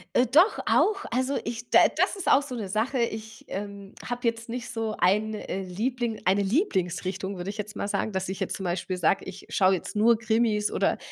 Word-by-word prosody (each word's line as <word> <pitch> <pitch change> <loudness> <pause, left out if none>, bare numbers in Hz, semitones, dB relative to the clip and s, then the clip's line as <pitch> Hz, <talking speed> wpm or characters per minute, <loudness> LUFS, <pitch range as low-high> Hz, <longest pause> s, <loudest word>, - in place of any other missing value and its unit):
Äh, 245 - +5
doch 315 - +5
auch, 410 -1 +2
also, 260 +3 0
ich 230 0 -5
d - - +6 0.2
das - - +2
ist 390 - -6
auch 275 - +6
so 275 -3 -6
'ne 215 -4 -4
Sache, 220 +7 -1
ich, 220 -1 -3
ähm, 200 0 -6
habe 245 0 -4
jetzt 230 0 -2
nicht 245 +1 -5
so 225 -2 -2
ein, 210 +4 +2
äh, 195 -2 -4
Liebling 225 +5 -2
eine 190 +3 +3
Lieblingsrichtung 190 - -1
würde 180 +3 -4
ich 210 - -11
jetzt 210 0 -5
mal - - -3
sagen, 215 - -1
dass 190 -1 -2
ich 190 +1 -5
jetzt - - -2
zum 195 - -6
Beispiel 180 +1 -2
sage: 180 +2 +1
„Ich - - -9
schaue 190 -1 +3
jetzt 180 - -6
nur 225 +2 +5
Krimis 220 -1 +1
oder - - +1
215 Hz, 215 wpm, -26 LUFS, 195-240 Hz, 0.2 s, d